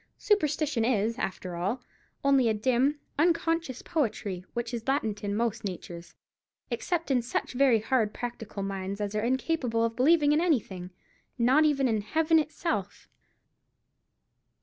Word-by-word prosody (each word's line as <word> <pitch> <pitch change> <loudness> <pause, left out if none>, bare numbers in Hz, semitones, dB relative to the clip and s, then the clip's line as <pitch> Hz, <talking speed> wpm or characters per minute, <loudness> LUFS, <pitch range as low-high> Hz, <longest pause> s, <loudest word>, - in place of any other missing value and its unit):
Superstition 300 - +1
is, 230 0 +1
after 185 -1 -4
all, 200 +9 -2 0.4
only 275 -4 +4
a 220 - +1
dim, 260 +6 +1 0.2
unconscious 330 -4 +1
poetry, 210 - -2
which 240 0 -3
is 230 0 -5
latent 220 -7 0
in 200 0 -1
most 225 0 -1
natures, 175 -3 -7 0.6
except 335 -5 -1
in 255 -2 +3
such 235 - -3
very 255 -2 +4
hard 225 -2 +1
practical 225 -4 -6
minds 195 0 -4
as 205 0 -2
are 210 - 0
incapable 250 -1 0
of 230 0 -3
believing 295 +3 +4
in 300 +2 +3
anything—not 245 - 0
even 275 -3 +2
in 220 -3 +1
Heaven 320 +8 +3
itself. 295 - -3
240 Hz, 135 wpm, -28 LUFS, 210-295 Hz, 0.6 s, only